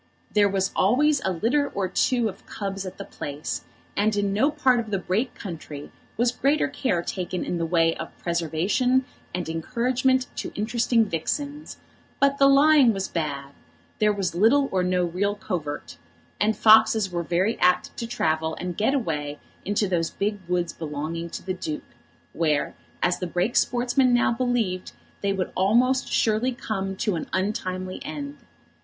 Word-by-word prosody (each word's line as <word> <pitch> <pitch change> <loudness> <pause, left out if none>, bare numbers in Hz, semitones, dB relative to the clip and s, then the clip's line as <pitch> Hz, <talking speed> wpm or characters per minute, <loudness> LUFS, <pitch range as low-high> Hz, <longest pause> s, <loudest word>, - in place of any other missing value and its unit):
There 205 -1 +4
was 195 -1 0
always 275 +8 +3
a 190 - +1
litter 235 - +1
or 195 -2 0
two 240 +5 +1
of 195 -2 -9
cubs 195 -1 -4
at 185 - -8
the - - -7
place, 145 +1 -5 0.3
and 210 +1 +2
in 200 -1 0
no 260 +8 +3
part 265 -5 +2
of 225 -2 -4
the 200 - 0
Brake 195 +7 -1
country 155 -6 -8 0.3
was 240 +1 +3
greater 280 +4 +1
care 180 -11 -1
taken 180 0 -3
in 175 - -2
the 165 - -1
way 165 -1 +3
of - - -8
preservation 175 - +1 0.3
and 180 -1 -3
encouragement 250 +9 +1
to - - -4
interesting 230 +1 +2
vixens; 285 - -3 0.4
but 280 0 +3
the 275 - +7
lying 275 -3 +6
was 195 -1 -2
bad; 140 -4 -3 0.5
there 210 0 +4
was 195 -4 -2
little 235 +10 +4
or 185 - +1
no 180 0 +1
real 195 +4 -1
covert; 155 - -5 0.4
and 215 +1 +2
foxes 220 -2 +5
were 175 -1 -1
very 180 +6 0
apt 180 0 +2
to 230 - -4
travel 160 -7 0
and 180 -1 -4
get 220 +7 +2
away 150 - -2 0.3
into 205 +1 +1
those 170 -3 0
big 205 +1 -2
woods 175 -1 0
belonging 160 +2 -4
to - - -7
the 185 - -1
Duke, 160 -4 -5 0.5
where, 155 -3 0 0.3
as 180 0 +2
the 180 - -3
Brake 180 +7 -1
sportsmen 245 +1 +3
now 240 - +3
believed, 230 -7 -1 0.3
they 200 - +1
would 190 -2 -2
almost 245 +7 +2
surely 225 +4 +2
come 195 -5 -3
to 195 0 -1
an 165 - -4
untimely 185 -1 -2
end. 285 -1 -6
200 Hz, 165 wpm, -25 LUFS, 175-240 Hz, 0.5 s, the